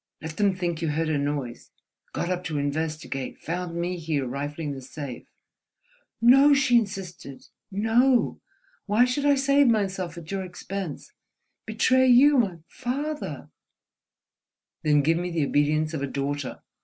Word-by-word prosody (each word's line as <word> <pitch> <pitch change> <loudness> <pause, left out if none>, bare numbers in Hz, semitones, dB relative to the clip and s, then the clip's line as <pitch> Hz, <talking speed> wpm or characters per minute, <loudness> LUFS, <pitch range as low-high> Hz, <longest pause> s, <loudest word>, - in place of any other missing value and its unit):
Let 160 +1 -7
them 200 -2 +2
think 175 -3 -3
you 165 - -1
heard 160 +2 -1
a 155 - +1
noise, 140 -4 -4 0.4
got 175 - -2
up 180 0 -2
to 155 -2 -2
investigate, 145 -2 -3
found 175 +1 -4
me 175 +1 -2
here, 155 -4 -1
rifling 145 +4 -4
the 135 -1 -6
safe—" 135 -1 -8 0.9
"No," 270 +5 +6
she 265 -3 +3
insisted—"no! 205 - -1 0.5
Why 215 +4 +4
should 280 +3 0
I 285 - +5
save 275 +1 +3
myself 190 -6 0
at 165 0 -9
your 195 -1 -2
expense?—betray 200 - -2
you—my 245 - +5
father—!" 285 +5 -4 1.3
"Then 150 -3 +3
give 165 +3 +2
me 180 0 -3
the 165 -4 0
obedience 155 +2 +1
of 155 - -3
a 140 - -1
daughter... 140 0 -4
175 Hz, 135 wpm, -25 LUFS, 150-230 Hz, 1.3 s, No